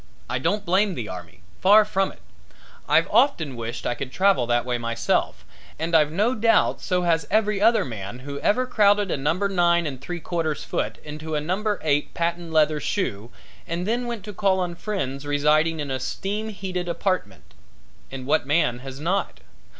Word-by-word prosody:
I 125 - -2
don't 195 +8 0
blame 190 +2 +2
the 115 -7 -4
army, 90 +1 -9 0.2
far 210 +3 +6
from 195 -2 0
it; - - -19 0.7
I've - - +4
often 160 - +2
wished 115 0 -5
I 120 - +1
could 130 +2 -6
travel 190 -10 +2
that 120 0 +1
way 125 -1 -1
myself, 115 0 -1 0.3
and 165 +2 -1
I've 150 -2 +4
no 210 +9 +1
doubt 225 -1 +2
so 180 -2 0
has 165 -2 +1
every 210 -2 +1
other 225 +1 +4
man 110 -2 -6
who 140 +2 -7
ever 255 - +2
crowded 205 -4 +3
a - - +1
number 165 +9 0
nine 175 -3 +2
and 135 -4 -5
three 175 +4 -5
quarters 160 -3 -2
foot - - -3
into 155 +1 -6
a - - +1
number 200 +7 -1
eight 150 -2 0
patent 170 0 -2
leather 155 -1 +3
shoe, 120 - -2 0.4
and 170 +2 -2
then 240 +3 -1
went 235 -4 -5
to 210 - -7
call 190 -1 +2
on 180 -1 -2
friends 150 -8 -4
residing 155 +3 +2
in 145 -2 -3
a 130 - -1
steam 205 - -3
heated 185 -4 -4
apartment. 170 - -3 0.6
As 135 -1 -6
what 130 +1 +1
man 145 -5 +2
has 135 +1 -8
not? 180 +6 -2
170 Hz, 185 wpm, -24 LUFS, 135-200 Hz, 0.7 s, far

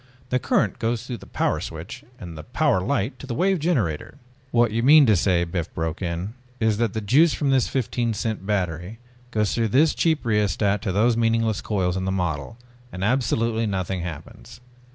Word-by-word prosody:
"The 125 - +2
current 105 -5 0
goes 115 +1 -1
through 125 -2 -5
the - - -14
Power - - 0
Switch 80 +4 -7 0.2
and 90 -6 -8 0.2
Power 95 - +2
Light 100 +6 -1
to 140 - -9
the 120 - -3
Wave 190 +5 +2
Generator 130 - -1 0.2
..." 130 0 -34
"What 120 -2 +3
you 115 +2 0
mean 145 +4 +7
to 110 -4 +4
say," 90 -1 +2
Biff 85 -1 -4
broke 80 +1 -3
in, 90 +3 -3 0.3
"is 110 -2 +2
that 115 -4 0
the 110 - -2
juice 140 +10 +4
from 140 -2 0
this 130 -2 +3
fifteen 120 -3 -1
cent 110 -1 -3
battery 95 0 -2 0.3
goes 105 -4 0
through 115 -1 +1
this 145 +9 +3
cheap 160 -5 +1
rheostat 105 -2 +1
to 105 - -2
those 110 +5 +3
meaningless 115 -2 +1
coils 95 -4 -1
in 95 0 -2
the 95 - -1
model 90 -1 -3 0.3
and 90 +1 -5
absolutely 115 -1 +1
nothing 95 -2 -2
happens. 85 -4 -9
110 Hz, 195 wpm, -23 LUFS, 95-120 Hz, 0.3 s, mean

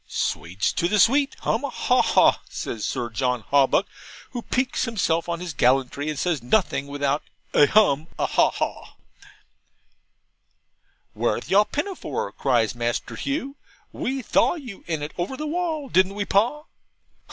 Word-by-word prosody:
'Sweets 90 +4 -2
to 170 - +1
the 210 - +1
sweet! 275 +6 +4
hum - - 0
a - - -2
ha - - +2
haw!' - - +4
says 110 -3 -5
Sir 125 -3 -2
John 125 0 -1
Hawbuck, 140 +7 +4 0.5
who 245 - -4
piques 255 +2 -1
himself 175 -8 0
on 170 -1 -2
his 175 -3 -5
gallantry, 135 +3 +1
and 150 - -3
says 165 -2 0
nothing 140 - +1
without 145 +1 -1 0.3
'a 145 - +6
hum 160 -7 +3
a - - +1
ha - - +3
a - - -3
haw!' - - -4 2.2
'Whereth - - -2
yaw 205 +2 +6
pinnafaw?' 355 - -4
cries 120 -5 +1
Master 120 0 -3
Hugh. 280 -1 -3 0.3
'WE 265 0 -3
thaw - - +2
you 250 - -9
in 160 -3 -2
it, 150 - -6
over 195 +10 -2
the 305 - -4
wall, 320 -2 -2
didn't 190 -3 +2
we, 205 0 -2
Pa?' 235 +11 +1
175 Hz, 155 wpm, -24 LUFS, -, 2.2 s, a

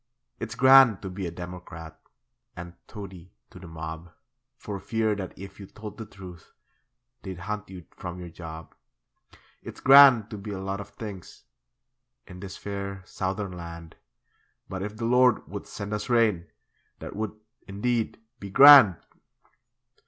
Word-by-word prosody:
It's 110 -1 -6
grand 130 -4 +7
to 95 - -5
be 95 -1 -5
a - - -3
democrat 90 -2 -9 0.6
And 85 0 -9
toady 95 -4 -11 0.2
to 90 - -13
the 90 - -11
mob, 80 +1 -8 0.5
For 100 -2 -6
fear 110 +1 -1
that 95 -2 -5
if 95 +1 -11
you 100 - -10
told 105 +2 -10
the 110 - -7
truth 90 -4 -13 0.7
They'd 95 -2 -7
hunt 105 +1 -5
you 90 -3 -11
from 90 0 -8
your 90 -1 -9
job. 80 -2 -10 0.9
It's - - -10
grand 135 -5 +7
to 105 - -6
be 105 +2 -8
a 100 -2 -5
lot 95 +1 -4
of 100 - -11
things 100 -5 -10 0.8
In 90 - -12
this 95 0 -8
fair 100 -1 -6
Southern 95 +1 -4
land, 85 -2 -10 0.7
But 95 -1 -6
if 105 +2 -6
the 115 - -4
Lord 125 0 +3
would - - -8
send 100 +1 -6
us 105 +2 -4
rain, 110 -8 +2 0.5
That - - -9
would, 110 0 -5 0.3
indeed, 110 +3 -2 0.2
be 100 - -8
grand! 135 -3 +9
100 Hz, 150 wpm, -26 LUFS, 90-110 Hz, 0.9 s, grand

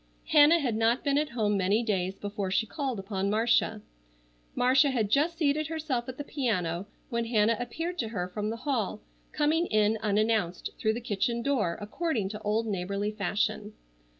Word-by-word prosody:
Hannah 300 +3 +7
had 255 -9 -1
not 225 +3 +2
been 280 0 +2
at 300 0 -1
home 215 -3 0
many 200 +5 +2
days 190 -4 -1
before 205 -1 -4
she 190 +4 +1
called 265 0 -3
upon 195 0 -2
Marcia. 220 0 +2 0.7
Marcia 260 +3 +4
had 225 -6 0
just 315 +6 +2
seated 305 -1 +1
herself 295 -6 -3
at 255 - -7
the 290 - -4
piano 195 - -2 0.2
when 235 0 0
Hannah 225 -1 +3
appeared 330 +9 -4
to 225 - 0
her 190 -5 -3
from 210 +3 -3
the 225 - -3
hall, 225 -7 -1 0.3
coming 315 +3 +1
in 215 0 +2
unannounced 215 -3 0
through 220 0 +1
the 235 - -4
kitchen 235 +2 -1
door 230 -12 0
according 215 - -2
to 210 +1 -7
old 215 +2 0
neighborly 200 0 -2
fashion. 210 +1 -2
220 Hz, 175 wpm, -28 LUFS, 205-270 Hz, 0.7 s, Hannah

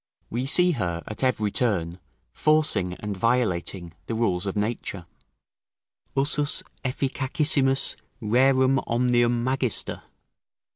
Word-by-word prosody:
We 125 +3 -2
see 180 +5 +4
her, 85 - -2
at 110 +4 -4
every 110 -5 +1
turn, 90 -8 0 0.3
forcing 155 -13 +2
and 105 +1 -5
violating 95 -6 -1
the 115 - -2
rules 100 -5 0
of 95 - -3
nature: 105 -4 -3 1.1
"Usus 145 +1 +1 0.2
efficacissimus 135 +1 0 0.2
rerum 130 +3 +3
omnium 120 0 +2
magister." 130 -2 -1
120 Hz, 100 wpm, -25 LUFS, 100-135 Hz, 1.1 s, see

